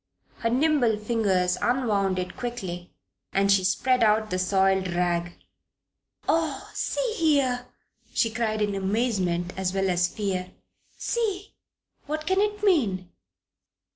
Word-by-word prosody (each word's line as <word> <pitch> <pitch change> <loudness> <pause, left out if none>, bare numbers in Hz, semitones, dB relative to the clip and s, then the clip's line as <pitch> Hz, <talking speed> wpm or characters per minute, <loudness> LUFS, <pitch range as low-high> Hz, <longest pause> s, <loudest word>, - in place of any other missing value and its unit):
Her 230 - 0
nimble 255 -3 +2
fingers 205 -5 +1
unwound 210 -7 +1
it 180 0 -4
quickly 190 -8 -5 0.4
and 195 +1 +3
she 195 -1 +4
spread 250 +7 +2
out 215 0 +3
the 185 - 0
soiled 190 0 +2
rag. 175 0 0 0.9
"Oh, 315 -4 0
see - - -1
here!" 270 -6 +2 0.4
she 230 - +1
cried, 220 -2 -1
in 205 -1 -1
amazement 190 -4 0
as 190 0 -2
well 195 -1 +1
as 175 0 +2
fear. 185 -2 -3 0.4
"See! 420 -4 -2 0.5
What 310 +1 -3
can 375 +3 +2
it 415 0 -1
mean? 205 - +2
210 Hz, 125 wpm, -26 LUFS, 185-255 Hz, 0.9 s, she